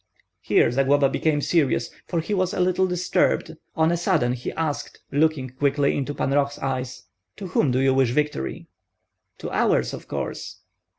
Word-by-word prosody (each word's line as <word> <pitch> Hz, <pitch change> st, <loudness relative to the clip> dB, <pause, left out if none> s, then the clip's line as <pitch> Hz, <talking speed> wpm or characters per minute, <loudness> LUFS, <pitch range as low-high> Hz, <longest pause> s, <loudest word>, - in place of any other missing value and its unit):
Here -, -, +3 dB
Zagloba 135 Hz, +2 st, +3 dB
became 150 Hz, 0 st, 0 dB
serious, 145 Hz, -7 st, +1 dB, 0.2 s
for 170 Hz, -2 st, -1 dB
he 185 Hz, +6 st, -3 dB
was 185 Hz, -2 st, 0 dB
a -, -, -3 dB
little 185 Hz, +1 st, +2 dB
disturbed; 180 Hz, -2 st, +1 dB, 0.2 s
on 160 Hz, +1 st, +3 dB
a 170 Hz, -, +1 dB
sudden 165 Hz, -9 st, +1 dB
he 125 Hz, -1 st, -5 dB
asked, 155 Hz, -3 st, -3 dB
looking 145 Hz, -3 st, +1 dB
quickly 140 Hz, +2 st, +1 dB
into 145 Hz, +1 st, -3 dB
Pan 135 Hz, -, -1 dB
Roh's 140 Hz, 0 st, +1 dB
eyes, 130 Hz, -2 st, -4 dB, 0.3 s
"To 195 Hz, -, -7 dB
whom 150 Hz, -, +2 dB
do 125 Hz, -, +1 dB
you 135 Hz, 0 st, +3 dB
wish 130 Hz, -2 st, +3 dB
victory?" 150 Hz, -, -2 dB, 0.7 s
"To -, -, -6 dB
ours, -, -, +1 dB
of -, -, -8 dB
course." -, -, -5 dB
145 Hz, 170 wpm, -24 LUFS, 135-165 Hz, 0.7 s, Here